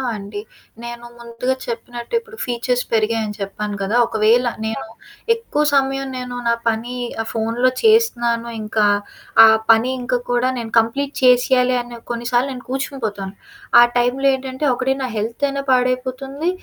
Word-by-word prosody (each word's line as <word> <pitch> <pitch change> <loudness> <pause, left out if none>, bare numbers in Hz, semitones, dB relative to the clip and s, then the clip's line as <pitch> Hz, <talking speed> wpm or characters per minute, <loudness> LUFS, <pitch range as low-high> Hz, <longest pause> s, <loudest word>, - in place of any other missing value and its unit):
అండి. 205 0 -7 0.4
నేను 240 0 -7
ముందుగా 235 +2 -2
చెప్పినట్టు, 240 - -7
ఇప్పుడు 460 -1 -15
ఫీచర్స్ 245 0 -1
పెరిగాయని 220 -1 0
చెప్పాను 205 +1 -4
కదా! 195 +4 -1
ఒకవేళ 220 +3 +3 0.2
నేను 220 0 -3 0.5
ఎక్కువ 455 -10 -1
సమయం 270 0 +1
నేను 250 -1 -5
నా 235 - +4 0.2
పనీ 230 +3 -3 0.3
ఆహ్, 225 - -6
ఫోనులో 230 +3 +1
చేస్తున్నాను, 240 - +3
ఇంకా 215 0 +1 0.6
ఆ - - +11 0.3
పని 225 +3 +4
ఇంక 250 0 -1 0.2
కూడా 245 +1 +2
నేను 230 -2 -5
కంప్లీట్ 275 +6 -1
చేసెయ్యాలి 250 0 +4
అనే 240 0 -10
కొన్నిసార్లు 240 +2 0
నేను 250 -1 -8
కూర్చునిపోతాను. 225 -8 -4 0.5
ఆ - - +9
టైంలో 245 +3 +1
ఏంటంటే, 265 +2 -3
ఒకటి 255 +2 0
నా - - -1
హెల్తయినా 275 +6 -2
పాడైపోతుంది. 255 +4 0
245 Hz, 135 wpm, -20 LUFS, 230-260 Hz, 0.6 s, ఆ